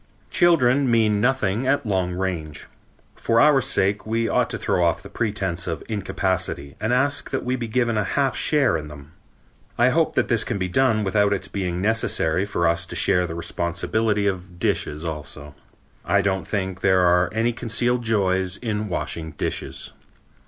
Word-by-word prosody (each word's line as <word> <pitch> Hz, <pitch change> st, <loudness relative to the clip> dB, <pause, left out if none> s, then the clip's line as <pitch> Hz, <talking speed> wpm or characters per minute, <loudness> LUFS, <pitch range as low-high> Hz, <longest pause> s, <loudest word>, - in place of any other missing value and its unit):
Children 140 Hz, -6 st, +3 dB
mean 110 Hz, -3 st, +2 dB
nothing 125 Hz, -2 st, +1 dB
at 135 Hz, -1 st, +1 dB
long 95 Hz, -4 st, 0 dB
range. 85 Hz, -6 st, -4 dB, 0.5 s
For 115 Hz, 0 st, +1 dB
our 150 Hz, +3 st, +6 dB
own -, -, +3 dB
sake 100 Hz, -5 st, +1 dB
we 115 Hz, +1 st, -1 dB
ought -, -, +1 dB
to -, -, -3 dB
throw 90 Hz, -, 0 dB
off 85 Hz, -1 st, +1 dB
the -, -, -11 dB
pretense 95 Hz, -6 st, -2 dB
of 80 Hz, -3 st, -4 dB
incapacity 95 Hz, -8 st, -2 dB
and 110 Hz, +2 st, -1 dB
ask 140 Hz, +3 st, +1 dB
that 135 Hz, -, -3 dB
we 125 Hz, +1 st, 0 dB
be 120 Hz, -2 st, -4 dB
given 115 Hz, -1 st, 0 dB
a -, -, +1 dB
half 135 Hz, +7 st, 0 dB
share 145 Hz, -, +2 dB
in 75 Hz, -1 st, -7 dB
them. 75 Hz, 0 st, -12 dB, 0.7 s
I 120 Hz, +2 st, +4 dB
hope 160 Hz, +4 st, +1 dB
that -, -, +2 dB
this 115 Hz, -3 st, +2 dB
can 115 Hz, -, -3 dB
be 95 Hz, -1 st, -2 dB
done 110 Hz, +2 st, +2 dB
without 100 Hz, +1 st, +2 dB
its 95 Hz, -1 st, -4 dB
being 90 Hz, -2 st, -3 dB
necessary 100 Hz, -5 st, +1 dB
for 85 Hz, -4 st, 0 dB
us 85 Hz, +1 st, 0 dB
to -, -, -8 dB
share 90 Hz, -2 st, +2 dB
the 80 Hz, -, -6 dB
responsibility 100 Hz, +6 st, -1 dB
of 90 Hz, -2 st, -3 dB
dishes 75 Hz, -2 st, -1 dB
also. 75 Hz, -2 st, -7 dB, 0.5 s
I 100 Hz, +3 st, +2 dB
don't 95 Hz, -2 st, -1 dB
think 95 Hz, -2 st, -3 dB
there 95 Hz, -1 st, +3 dB
are 90 Hz, 0 st, +3 dB
any 115 Hz, +3 st, 0 dB
concealed 120 Hz, +1 st, 0 dB
joys 95 Hz, -5 st, 0 dB
in 105 Hz, -3 st, -3 dB
washing 80 Hz, -2 st, -4 dB
dishes. -, -, -4 dB
100 Hz, 180 wpm, -23 LUFS, 90-115 Hz, 0.7 s, our